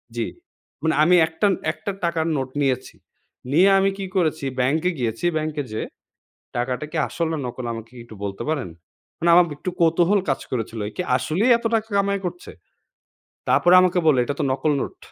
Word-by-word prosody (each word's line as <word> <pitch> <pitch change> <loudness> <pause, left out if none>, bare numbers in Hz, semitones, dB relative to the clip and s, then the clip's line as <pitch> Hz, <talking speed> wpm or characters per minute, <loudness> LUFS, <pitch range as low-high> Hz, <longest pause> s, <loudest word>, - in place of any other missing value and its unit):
জ্বী। 115 - -1 0.6
মানে 160 -2 +2
আমি 180 +3 +5
একটা, 165 +6 0 0.2
একটা 155 +5 -5
টাকার 165 -1 0
নোট 135 -1 -3
নিয়েছি। 130 -2 -1 0.6
নিয়ে 180 +6 +5
আমি 195 0 +3
কি 195 - -4
করেছি, 155 -5 0
ব্যাংকে 155 +8 +2
গিয়েছি। 115 +4 -2
ব্যাংকে 155 -1 -2
যেয়ে, 110 - -3 0.7
‘’টাকাটা 125 +3 -2
কি - - -3
আসল 165 -1 -2
না - - -1
নকল 125 0 -6
আমাকে 115 0 -8
কি - - -10
একটু 110 - -12
বলতে 100 -1 -4
পারেন?‘’ 145 - -2 0.5
মানে 170 - +1
আমার 175 +1 +7
একটু 185 - -4
কৌতূহল 170 +4 +4
কাজ 135 - 0
করেছিল। 115 -2 -3
একি 180 - -4
আসলেই 205 +11 +1
এত 235 - -13
টাকা 220 0 -1
কামাই 200 0 +1
করছে? 355 - -6 1.0
তারপরে 175 - +4
আমাকে 180 0 +2
বলল, 150 -5 +5
এটা 145 - -3
তো - - +1
নকল 135 +3 0
নোট। - - -6
155 Hz, 180 wpm, -22 LUFS, 130-180 Hz, 1.0 s, আমার